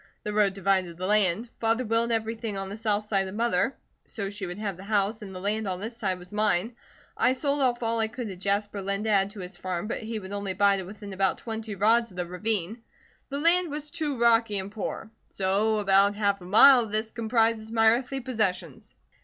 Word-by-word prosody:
The 210 - -3
road 205 -2 +2
divided 190 -3 0
the 185 - -4
land. 210 +2 +2
Father 230 +2 +1
willed 230 +1 +1
everything 225 -2 -2
on 195 0 -4
the 200 - -6
south 215 -1 -1
side 195 -2 0
to 190 - -6
Mother, 225 +1 0 0.3
so 200 -3 -5
she 200 -2 -6
would 175 +1 -6
have 205 -3 -3
the 185 - -11
house, 210 +1 0
and 195 -3 -9
the - - -6
land 210 +2 -2
on 185 -1 -3
this 225 +4 -5
side 195 -5 -2
was 180 +2 -14
mine. 210 +1 +1 0.4
I 255 - +3
sold 285 +1 0
off 245 -2 +1
all 230 0 0
I 220 - +1
could 240 +1 -6
to 190 - -6
Jasper 200 +2 -2
Linn 200 +1 -2
to 220 - 0
add 195 -1 +3
to 205 -1 -9
his 180 0 -8
farm, 180 0 -3
but 220 - -4
he 225 0 -4
would 190 -2 -8
only 200 -2 -3
buy 200 +1 +3
to 190 - -4
within 200 +1 -9
about 190 0 +1
twenty 220 -2 -6
rods 230 +4 +3
of 180 - -16
the 180 - -2
ravine. 205 +3 -2 0.5
The 280 0 -3
land 340 +2 +4
was 295 0 -4
too 300 -6 -2
rocky 230 -3 +3
and 195 +1 -5
poor. 220 +1 -5 0.2
So 200 +3 +1
about 200 0 +3
half 200 -2 0
a - - -10
mile 245 +8 +8
of 225 -3 -3
this 220 +1 0
comprises 225 -1 0
my 225 -1 +3
earthly 255 +3 0
possessions." 195 - -3
210 Hz, 230 wpm, -27 LUFS, 195-230 Hz, 0.5 s, mile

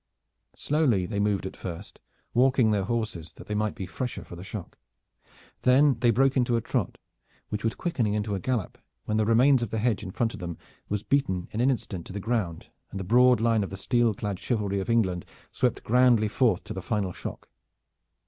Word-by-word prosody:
Slowly 140 - +1
they 100 +3 -3
moved 100 -2 +1
at 95 - -6
first, 85 -3 -8 0.3
walking 125 -2 +4
their 100 -2 +1
horses 105 -8 -3
that - - -12
they 105 - -4
might 105 0 -1
be 95 - -5
the 90 - -14
fresher 125 +2 -4
for - - -10
the 85 - -9
shock. 95 -2 -8 0.8
Then 135 0 +4
they 120 -1 +3
broke 135 +4 +3
into 125 -2 +2
a 115 - +1
trot - - -2 0.5
which 105 -1 -4
was 115 - 0
quickening 120 -12 -1
into 105 0 -1
a 100 - -1
gallop 120 -2 -2 0.3
when 110 - 0
the 110 -1 +2
remains 125 +3 +5
of 120 - -2
the 110 - -2
hedge 110 -1 +1
in 105 - -6
front 115 +4 -1
of - - -8
them 85 -2 -5 0.3
was 105 0 -2
beaten 130 -11 0
in 110 - -2
an 130 - +4
instant 100 -9 -3
to - - -9
the 100 - -3
ground 100 -6 -2 0.2
and 95 - -6
the - - -3
broad 125 +5 +5
line 115 -2 +2
of 100 - -5
the 95 - -7
steel 120 +1 +1
clad 100 -2 -4
chivalry 100 -5 -1
of 95 - -4
England 95 -7 +1 0.3
swept - - 0
grandly 120 -2 +4
forth 110 -5 +2
to - - -7
the 95 - -5
final 100 -2 -1
shock. - - -7
110 Hz, 215 wpm, -27 LUFS, 95-120 Hz, 0.8 s, remains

